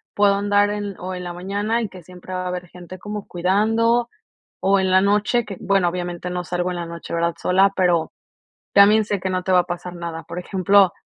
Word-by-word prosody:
puedo 205 Hz, -1 st, +4 dB
andar 205 Hz, 0 st, +2 dB
en 205 Hz, -1 st, -4 dB
o 185 Hz, +1 st, -5 dB
en 180 Hz, -, -6 dB
la 175 Hz, -1 st, -5 dB
mañana 205 Hz, +6 st, -2 dB
y 220 Hz, -, -3 dB
que 185 Hz, -2 st, -12 dB
siempre 180 Hz, +2 st, -11 dB
va 185 Hz, 0 st, -3 dB
a -, -, -2 dB
haber 180 Hz, 0 st, -5 dB
gente 180 Hz, +1 st, -11 dB
como 210 Hz, +2 st, -6 dB
cuidando, 225 Hz, +6 st, +1 dB, 0.5 s
o 195 Hz, +1 st, +3 dB
en 190 Hz, 0 st, +1 dB
la 185 Hz, 0 st, +5 dB
noche 210 Hz, +4 st, +2 dB
que, 200 Hz, -, -7 dB
bueno, 195 Hz, -3 st, +2 dB
obviamente 175 Hz, 0 st, -4 dB
no 180 Hz, 0 st, -3 dB
salgo 175 Hz, +1 st, -2 dB
en 180 Hz, -, -4 dB
la 170 Hz, -, -4 dB
noche, 170 Hz, 0 st, -8 dB
¿verdad?, 170 Hz, 0 st, 0 dB
sola, 190 Hz, +2 st, +4 dB
pero 175 Hz, -3 st, +2 dB, 0.6 s
también 210 Hz, +2 st, +6 dB
sé 205 Hz, -1 st, -2 dB
que 190 Hz, -, -3 dB
no 185 Hz, 0 st, -1 dB
te 190 Hz, -, -1 dB
va 180 Hz, -, +6 dB
a -, -, +2 dB
pasar 175 Hz, 0 st, -6 dB
nada. 170 Hz, -1 st, -6 dB
Por 170 Hz, +1 st, -7 dB
ejemplo, 190 Hz, 0 st, +3 dB
185 Hz, 230 wpm, -21 LUFS, 180-205 Hz, 0.6 s, también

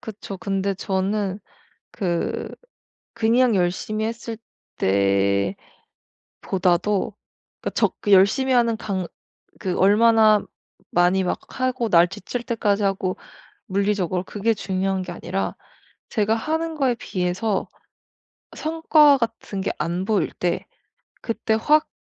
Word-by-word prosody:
그쵸. 205 Hz, -2 st, -8 dB
근데 195 Hz, -1 st, -1 dB
저는 195 Hz, +1 st, -1 dB, 0.5 s
그 175 Hz, -5 st, -2 dB, 0.6 s
그냥 230 Hz, +1 st, +3 dB
열심히 195 Hz, +4 st, -1 dB
했을 230 Hz, 0 st, -5 dB, 0.4 s
때보다도 100 Hz, 0 st, +1 dB, 1.9 s
그러니까 -, -, -2 dB
적 -, -, +1 dB
그 205 Hz, -, -1 dB
열심히 230 Hz, +8 st, +5 dB
하는 235 Hz, -2 st, +3 dB
강 190 Hz, -5 st, -3 dB, 0.5 s
그 185 Hz, -2 st, -2 dB
얼마나 215 Hz, +1 st, +5 dB, 0.5 s
많이 180 Hz, +2 st, +3 dB
막 180 Hz, -, -1 dB, 0.2 s
하고 255 Hz, -2 st, 0 dB
날 170 Hz, -2 st, +6 dB
지칠 240 Hz, +7 st, -6 dB
때까지 215 Hz, -4 st, 0 dB
하고 195 Hz, -2 st, -1 dB, 0.5 s
물리적으로 195 Hz, -3 st, 0 dB
그게 210 Hz, +4 st, 0 dB
중요한 190 Hz, -1 st, -1 dB
게 180 Hz, -1 st, -6 dB
아니라 180 Hz, +3 st, -3 dB, 0.5 s
제가 215 Hz, -1 st, +1 dB
하는 320 Hz, +7 st, -2 dB
거에 270 Hz, -5 st, +1 dB
비해서 190 Hz, 0 st, -2 dB, 0.9 s
성과 310 Hz, -2 st, +4 dB
같은 225 Hz, -4 st, -3 dB
게 -, -, -1 dB
안 170 Hz, +4 st, -2 dB
보일 200 Hz, -4 st, 0 dB
때 175 Hz, -1 st, -2 dB, 0.5 s
그때 225 Hz, -1 st, -1 dB
확 300 Hz, +8 st, +3 dB
200 Hz, 225 characters per minute, -23 LUFS, 185-230 Hz, 1.9 s, 날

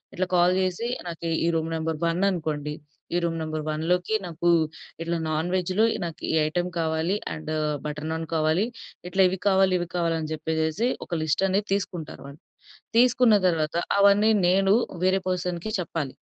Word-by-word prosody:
ఇట్లా 185 Hz, -, 0 dB
కాల్ 175 Hz, +1 st, +4 dB
జేసి 185 Hz, +5 st, -1 dB, 0.2 s
నాకు 170 Hz, 0 st, -5 dB, 0.2 s
ఈ -, -, +2 dB
రూమ్ 160 Hz, 0 st, 0 dB
నంబర్ 160 Hz, 0 st, -2 dB
వన్ 170 Hz, +1 st, 0 dB
అనుకోండి, 155 Hz, -5 st, -3 dB, 0.4 s
"ఈ -, -, +3 dB
రూమ్ 165 Hz, -1 st, -1 dB
నంబర్ 155 Hz, -1 st, -3 dB
వన్‌లోకి 175 Hz, +6 st, 0 dB
నాకు 170 Hz, 0 st, -1 dB, 0.5 s
ఇట్లా 170 Hz, +1 st, -1 dB
నాన్ 155 Hz, +2 st, -1 dB
వెజ్‌లో 185 Hz, +3 st, +1 dB, 0.2 s
నాకు 165 Hz, 0 st, -7 dB
ఈ -, -, -1 dB
ఐటెమ్ 175 Hz, +3 st, -1 dB
కావాలి. 160 Hz, +3 st, 0 dB, 0.2 s
అండ్ 155 Hz, 0 st, -6 dB, 0.3 s
బటర్ 150 Hz, +1 st, -4 dB
నాన్ 160 Hz, 0 st, -3 dB
కావాలి". 160 Hz, +5 st, +2 dB, 0.4 s
ఇట్లా 190 Hz, +1 st, +1 dB
ఇవి 190 Hz, 0 st, -4 dB
కావాలి, 190 Hz, -1 st, +4 dB
ఇవి 175 Hz, -, -3 dB
కావాలి 170 Hz, -2 st, +1 dB
అని 155 Hz, -1 st, -4 dB
జెప్పేసేసి 160 Hz, +7 st, -1 dB, 0.2 s
ఒక 170 Hz, -3 st, -2 dB
లిస్ట్ 160 Hz, +5 st, +1 dB
అనేది 200 Hz, +2 st, 0 dB
తీసుకుంటారు 185 Hz, -5 st, -4 dB
వాళ్ళు. 140 Hz, +2 st, -13 dB, 0.6 s
తీసుకున్న 245 Hz, -2 st, +5 dB
తర్వాత 160 Hz, -2 st, -1 dB, 0.2 s
అవన్నీ 200 Hz, +2 st, +5 dB, 0.2 s
నేను 195 Hz, +2 st, +4 dB, 0.3 s
వేరే 190 Hz, +1 st, +3 dB
పర్సన్‌కి 180 Hz, +2 st, -2 dB
చెప్పాలి. 160 Hz, -5 st, -4 dB
170 Hz, 160 wpm, -25 LUFS, 160-185 Hz, 0.6 s, తీసుకున్న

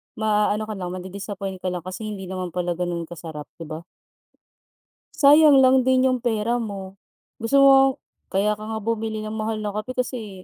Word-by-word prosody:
maaano 215 Hz, 0 st, +1 dB
ka 215 Hz, -, -4 dB
lang 180 Hz, -2 st, -5 dB
madi-disappoint 190 Hz, +1 st, -6 dB
ka 185 Hz, -, -1 dB
lang 180 Hz, -, -3 dB
kasi 185 Hz, +4 st, -6 dB
hindi 200 Hz, -2 st, -6 dB
naman 185 Hz, -2 st, -4 dB
pala 175 Hz, -1 st, -1 dB
ganun 175 Hz, -1 st, -2 dB
kasarap 160 Hz, -3 st, -8 dB
di 165 Hz, -, -7 dB
ba? 155 Hz, 0 st, -6 dB, 1.4 s
Sayang 290 Hz, -1 st, +7 dB
lang 260 Hz, 0 st, +4 dB
din 260 Hz, 0 st, +4 dB
yung 255 Hz, -, 0 dB
pera 235 Hz, 0 st, 0 dB
mo. 195 Hz, -3 st, -7 dB, 0.4 s
Gusto 230 Hz, +4 st, -1 dB
mo 275 Hz, -, +8 dB, 0.6 s
kaya 200 Hz, +2 st, +1 dB
ka 210 Hz, -, -4 dB
nga 220 Hz, 0 st, -3 dB
bumili 220 Hz, -1 st, -2 dB
ng 215 Hz, -, -5 dB
mahal 215 Hz, 0 st, -3 dB
na 205 Hz, -, -2 dB
kape 215 Hz, +5 st, -5 dB
kasi, 220 Hz, -7 st, -4 dB
210 Hz, 180 wpm, -23 LUFS, 185-230 Hz, 1.4 s, mo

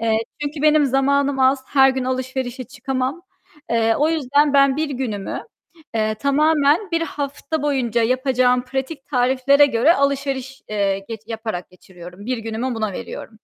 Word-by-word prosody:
Eee, 225 Hz, -1 st, +2 dB, 0.2 s
çünkü 290 Hz, 0 st, -4 dB
benim 305 Hz, -1 st, +4 dB
zamanım 275 Hz, +1 st, +1 dB
az, 260 Hz, 0 st, +3 dB
her 270 Hz, -1 st, +5 dB
gün 260 Hz, -1 st, -3 dB
alışverişe 255 Hz, 0 st, -3 dB
çıkamam. 265 Hz, +4 st, -3 dB, 0.5 s
Eee, 225 Hz, -1 st, +2 dB
o 300 Hz, -, +3 dB
yüzden 290 Hz, -2 st, +2 dB
ben 275 Hz, -1 st, +4 dB
bir 310 Hz, -1 st, -1 dB
günümü, 235 Hz, -7 st, -4 dB, 0.5 s
eee, 215 Hz, -1 st, 0 dB
tamamen 300 Hz, -, +2 dB
bir 335 Hz, -1 st, +1 dB
hafta 290 Hz, 0 st, -4 dB
boyunca 255 Hz, -6 st, 0 dB
yapacağım 250 Hz, 0 st, +2 dB
pratik 270 Hz, +2 st, -5 dB
tariflere 265 Hz, +2 st, +3 dB
göre 275 Hz, +6 st, +3 dB
alışveriş, 275 Hz, -1 st, -2 dB
eee, 200 Hz, -2 st, 0 dB
geç 225 Hz, -2 st, -6 dB
yaparak 220 Hz, -5 st, -5 dB
geçiriyorum. 180 Hz, +2 st, -13 dB
Bir 255 Hz, -1 st, -1 dB
günümü 225 Hz, +3 st, -3 dB
buna 215 Hz, -2 st, -2 dB
veriyorum. 220 Hz, +4 st, -8 dB
265 Hz, 145 wpm, -21 LUFS, 230-280 Hz, 0.5 s, her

